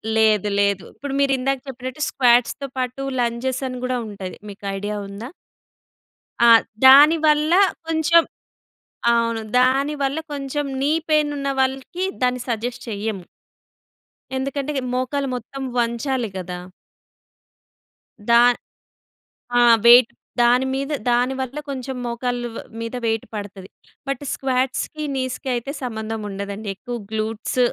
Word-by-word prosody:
లేదు, 215 -2 +3
లేదు. 200 -2 +1
ఇప్పుడు 285 -1 -6
మీరు 280 -1 +3
ఇందాక 270 +1 0
చెప్పినట్టు 260 +2 -7
స్క్వాట్స్‌తో 245 +2 +2
పాటు 255 +1 -3 0.2
లంజెస్ 245 +2 -1
అని 255 -1 -5
కూడా 255 0 -1
ఉంటాయి. 195 -3 -7 0.2
మీకు 205 0 -12
ఐడియా 205 +2 -3
ఉందా? 200 +5 -8 1.2
ఆ! - - +8 0.4
దానివల్ల 300 +3 +7 0.4
కొంచెం 325 +1 +4 0.9
అవును. 230 -1 +1 0.2
దానివల్ల 275 +2 +1 0.2
కొంచెం 285 +1 -3 0.2
నీ 285 +2 +2 0.2
పెయిన్ 305 -1 +3
ఉన్న 275 0 -2
వాళ్ళకి 265 +7 -1 0.2
దాన్ని 250 0 +1
సజెస్ట్ 240 +2 -3
చెయ్యము. 205 -2 -3 1.1
ఎందుకంటే 275 +2 -2 0.2
మోకాలు 265 +2 -1
మొత్తం 250 +3 -7 0.2
వంచాలి 235 0 0
గదా! 180 -1 -5 1.7
దా 235 0 +7 1.2
ఆ! - - +6 0.2
వెయిట్ 240 0 +8 0.3
దాని 245 +2 +4
మీద 275 +2 -2 0.2
దాని 245 +2 +2
వల్ల 260 +2 -5
కొంచెం 265 -1 -4
మోకాళ్ళ 240 +1 -2
వ్ - - -7 0.2
మీద 230 +1 -5
వెయిట్ 225 -1 0
పడతది. 200 -2 -7 0.4
బట్ 275 0 -3
స్క్వాట్స్‌కి, 265 +3 -1
నీస్‍కి 260 +1 -3
అయితే 240 +3 -4
సంబంధం 220 -2 -4
ఉండదండి. 200 +1 -5
ఎక్కువ 245 +5 -6 0.2
గ్లూట్స్ 220 +3 -2
250 Hz, 115 wpm, -22 LUFS, 225-275 Hz, 1.7 s, ఆ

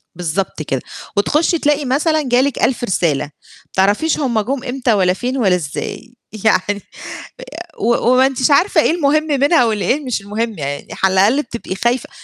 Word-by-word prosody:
بالضبط 180 0 -3
كده. 135 -4 -2 0.4
وتخُشّي 315 - +2
تلاقي 295 -1 +1
مثلًا 310 +4 +1
جه 250 -1 +2
لِك 280 -1 -1
1000 250 - +1
رسالة، 170 -9 0
ما 145 - -15 0.4
تعرفيش 205 +12 +1
هُم 240 -6 0
جُم 260 +4 -3
إمتى 250 -2 0
والَّا 185 -3 +2
فين 250 +7 -3
والَّا 195 -8 +3
إزاي! 180 - -6 0.3
يعني 205 -1 +2 1.0
و 235 +2 +2 0.2
وما 255 +1 +5
أنتيش 265 +1 +1
عارفة 335 +3 +4
إيه - - +2
المهم 310 -2 +2
منها 285 -1 +3
والإيه 220 +4 0
مش 250 -5 -2
المهم 215 +1 -3
يعني، 140 -1 -5
على 190 0 0
الأقل 210 +10 +3
بتبقي 235 -6 -7
خايفة 240 +5 -1
240 Hz, 165 wpm, -17 LUFS, 195-280 Hz, 1.0 s, وما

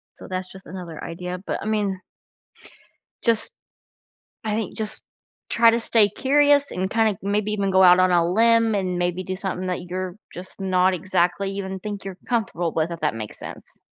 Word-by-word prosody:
So - - -12
that's 185 0 -4
just 190 0 -13
another 175 -4 -8
idea, 180 +2 -5
but - - -2
I - - -6
mean 205 -3 -1 1.2
just 230 -2 +1 0.9
I 215 -1 -1
think 220 +1 -3
just 215 0 -4 0.5
try 230 0 +6
to 230 - +1
stay 220 -2 +3
curious 285 +4 +3
and 190 +1 -2
kinda 220 -3 +2
maybe 205 +1 0
even 200 -2 0
go 190 0 +5
out 180 0 +8
on 185 0 +4
a 170 -1 +4
limb 230 +1 +4
and 185 -2 -1
maybe 175 +1 -1
do 185 +1 -4
something 185 -1 -3
that 180 -1 -2
you're 185 0 -4 0.2
just 185 +2 -10
not 185 0 +3
exactly 185 +2 0
even 190 -1 -4
think 205 0 -6
you're 190 -1 -6
comfortable 185 -8 -1
with, 160 +1 0
if 165 - -5
that 150 -7 0
makes 110 -2 -7
sense. - - -10
190 Hz, 185 wpm, -23 LUFS, 180-215 Hz, 1.2 s, out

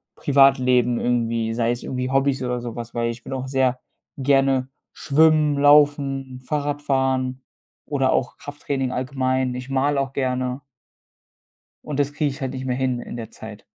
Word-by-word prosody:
Privatleben 130 -3 +3
irgendwie, 115 -2 0
sei 115 0 +1
es 120 - -4
irgendwie 125 0 -3
Hobbys 135 -1 +1
oder 125 0 -2
sowas, 120 0 -7
weil 115 0 0
ich 115 +1 -10
will - - -6
auch 130 0 -4
sehr 130 -1 +1 0.4
gerne 135 -1 +2 0.3
schwimmen, 155 0 +3
laufen, 140 -3 +3
Fahrrad 145 +1 -2
fahren 130 -2 0 0.4
oder 135 -3 +1
auch 125 - -1
Krafttraining 140 -3 -4
allgemein. 130 -1 -1
Ich 125 +1 -7
male 140 +1 +1
auch 135 -1 -4
gerne. 130 -1 -1 1.3
Und 145 -2 -5
das 145 0 +1
kriege 150 -1 0
ich 135 - -9
halt 130 -1 -3
nicht 130 -1 -5
mehr 125 -1 -1
hin 130 -2 -1
in 120 - -8
der 115 -2 -7
Zeit. 110 -1 -11
130 Hz, 160 wpm, -22 LUFS, 125-140 Hz, 1.3 s, Privatleben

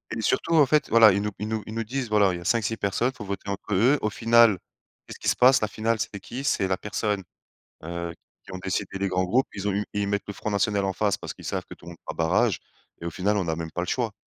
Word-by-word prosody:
Et 110 - -3
surtout, 165 - 0
en 150 -3 +7
fait, 150 +2 +2
voilà, 110 -2 +8
ils 100 +2 +1
nous 105 0 -2
ils 105 - -4
nous 110 -1 -2
ils 110 - -7
nous 115 0 -2
disent: 125 +1 -3
«Voilà, 100 -3 +4
il - - -3
y - - -9
a - - -11
5-6 115 0 +1
personnes, 110 +6 0
faut 105 -5 -9
voter 100 0 -5
entre 100 +1 -4
eux», 125 +10 +4
au 105 - +1
final, 115 -1 +5 0.5
qu'est-ce - - -10
qui - - -5
se - - +3
passe? 130 +1 +5
La 110 - +1
finale, 110 +2 -1
c'est 100 -2 -3
qui? 130 +6 -6
C'est 95 - +1
la 95 - +1
personne, 105 -2 -2 0.6
heu, 85 0 -4 0.3
qui 95 - -12
ont 95 - -5
décidé 95 +1 -3
les 100 0 -1
grands 95 0 0
groupes. 125 +9 +2
Ils 100 0 -4
ont 100 - +1
eu 105 +1 -1
ils 100 -1 -1
mettent 100 0 -1
le 100 - -5
Front 110 - -4
National 100 0 +1
en 95 - -1
face, 100 +1 0
parce - - -7
qu'ils - - -12
savent - - -3
que - - -8
tout - - -18
le - - -8
monde 85 - -11
fera - - -6
barrage 90 +4 +2 0.4
et - - -6
au 85 - -3
final, 100 +5 0
on 90 -4 -1
a 80 - 0
même 80 -1 -5
pas 90 - -3
le 90 - -4
choix. 115 -5 -1
105 Hz, 295 wpm, -25 LUFS, 95-115 Hz, 0.6 s, voilà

